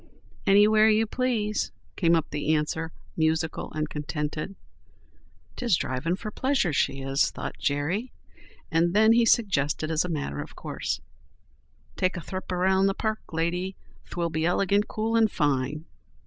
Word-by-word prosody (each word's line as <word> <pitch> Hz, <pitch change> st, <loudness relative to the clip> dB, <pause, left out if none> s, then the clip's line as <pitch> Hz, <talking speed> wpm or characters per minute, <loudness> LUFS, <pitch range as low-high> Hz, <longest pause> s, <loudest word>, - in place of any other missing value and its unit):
"Anywhere 215 Hz, +2 st, +6 dB
you 220 Hz, +1 st, +3 dB
please," 220 Hz, -3 st, -1 dB, 0.2 s
came 170 Hz, -2 st, +3 dB
up 160 Hz, -, -1 dB
the 150 Hz, +1 st, +1 dB
answer, 160 Hz, +2 st, -2 dB, 0.2 s
musical 160 Hz, 0 st, 0 dB
and 155 Hz, 0 st, -1 dB
contented. 150 Hz, +4 st, -4 dB, 1.0 s
"'Tis 235 Hz, -9 st, +2 dB
drivin' 145 Hz, +7 st, -1 dB
for 215 Hz, +2 st, -6 dB
pleasure 260 Hz, -, +1 dB
she 135 Hz, 0 st, +1 dB
is," 135 Hz, +1 st, +2 dB
thought -, -, -6 dB
Jerry. 160 Hz, -, -1 dB, 0.6 s
And 170 Hz, +2 st, +2 dB
then 220 Hz, +1 st, +6 dB
he 235 Hz, 0 st, +4 dB
suggested 155 Hz, -9 st, +2 dB
as 160 Hz, +1 st, +2 dB
a 180 Hz, -, -4 dB
matter 75 Hz, -, -3 dB
of -, -, -10 dB
course: -, -, -4 dB, 1.0 s
"Take 185 Hz, +1 st, +1 dB
a -, -, -4 dB
thrip 185 Hz, +3 st, -6 dB
around 190 Hz, +1 st, +2 dB
in -, -, +5 dB
the 195 Hz, -, 0 dB
park, 220 Hz, -1 st, -1 dB
lady. 175 Hz, +3 st, -1 dB, 0.3 s
'Twill 170 Hz, -1 st, -2 dB
be 160 Hz, 0 st, -1 dB
ilegant 200 Hz, +4 st, +2 dB
cool 220 Hz, +1 st, -1 dB
and 225 Hz, -1 st, +4 dB
fine." 145 Hz, +1 st, 0 dB
175 Hz, 150 wpm, -26 LUFS, 155-210 Hz, 1.0 s, Anywhere